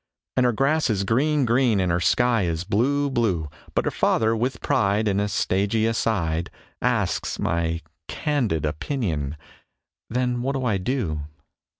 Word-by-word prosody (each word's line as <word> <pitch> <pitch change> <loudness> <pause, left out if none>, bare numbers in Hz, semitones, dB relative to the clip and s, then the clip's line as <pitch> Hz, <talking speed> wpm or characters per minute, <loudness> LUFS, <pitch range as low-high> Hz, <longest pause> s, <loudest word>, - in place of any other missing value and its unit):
And 130 -1 +4
her - - +3
grass 140 +6 +1
is 100 -3 +1
green 140 +7 +2
green 120 -2 +3
and 90 -2 +1
her 85 - +1
sky 120 +5 +3
is 85 -1 -2
blue 130 +9 +1
blue, 95 - 0 0.3
But - - +1
her - - 0
father, 110 0 +2
with 125 +3 -1
pride, 105 +2 +1
In 100 -1 +1
a 105 - +1
stagey 100 +2 +1
aside 90 -8 0 0.3
Asks - - 0
my 85 0 -1 0.3
"candid 120 - -1
opinion." 75 - -2 0.7
Then 125 0 0
what 135 +2 -1
do 135 -2 -2
I 110 -5 +2
do? 90 - -2
110 Hz, 155 wpm, -24 LUFS, 90-125 Hz, 0.7 s, And